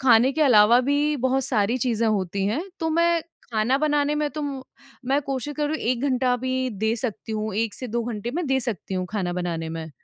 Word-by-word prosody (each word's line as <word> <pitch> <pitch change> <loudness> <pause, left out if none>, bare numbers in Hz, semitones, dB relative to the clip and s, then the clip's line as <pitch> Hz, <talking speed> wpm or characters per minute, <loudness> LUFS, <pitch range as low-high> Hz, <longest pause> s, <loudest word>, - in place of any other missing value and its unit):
खाने 250 0 +5
के 310 +2 +1
अलावा 235 -2 +6
भी 290 +3 +1
बहुत 260 +1 +1
सारी 230 -2 +1
चीज़ें 230 -2 0
होती 195 -2 -1
हैं, 230 +11 0 0.2
तो 325 -1 0
मैं 335 +1 +2 0.3
खाना 220 +4 +2
बनाने 295 -1 +1
में 300 0 0
तो 305 0 -5 0.6
मैं 275 +2 +2
कोशिश 275 +1 -4
करूँ 300 +1 0
1 245 -4 -1
घंटा 255 -2 +2
भी 260 +1 -1
दे 220 +2 0
सकती 225 -2 -4
हूँ, 215 -1 -2
1 220 0 -1
से 255 - -6
2 235 +1 -1
घंटे 235 -1 -4
मैं 345 0 -1
दे 265 -1 +2
सकती 220 -6 -3
हूँ 185 -1 -2
खाना 190 -4 -2
बनाने 170 -2 -3
में। 160 0 -6
245 Hz, 210 wpm, -24 LUFS, 215-285 Hz, 0.6 s, अलावा